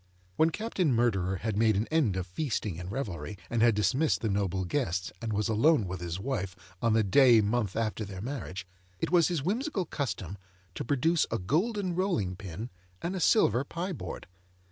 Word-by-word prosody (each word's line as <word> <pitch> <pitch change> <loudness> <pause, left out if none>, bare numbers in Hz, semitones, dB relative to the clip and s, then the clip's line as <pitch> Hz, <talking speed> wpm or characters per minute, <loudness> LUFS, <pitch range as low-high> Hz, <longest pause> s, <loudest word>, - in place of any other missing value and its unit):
When 160 +7 +4
Captain 190 -4 -1
Murderer 100 -6 +1
had 110 +2 -3
made 110 0 +3
an 105 +3 +1
end 145 - +2
of 95 - -2
feasting 100 - -3
and 90 +2 -6
revelry, 105 -5 -4
and 120 -1 +1
had 115 -2 +5
dismissed 135 +9 +2
the 110 - 0
noble 95 -2 0
guests, 95 - -1
and 115 -1 -3
was 105 +1 0
alone 115 +2 +3
with 90 0 -5
his 85 +1 -4
wife 95 -6 -3 0.3
on 115 -2 +3
the 110 0 +4
day 120 +3 +6
month 105 -2 0
after 110 -1 -1
their 95 -2 -7
marriage, 105 -5 -5 0.3
it 115 - -2
was 170 -3 +5
his 170 -6 -1
whimsical 215 - -1
custom 105 - -4 0.3
to - - -4
produce 150 +6 +2
a 115 - 0
golden 180 - 0
rolling 170 - 0
pin 100 +6 -7 0.3
and 180 +3 -3
a - - -2
silver 135 - +4
pie 175 +6 -4
board. - - -7
115 Hz, 190 wpm, -29 LUFS, 95-155 Hz, 0.3 s, day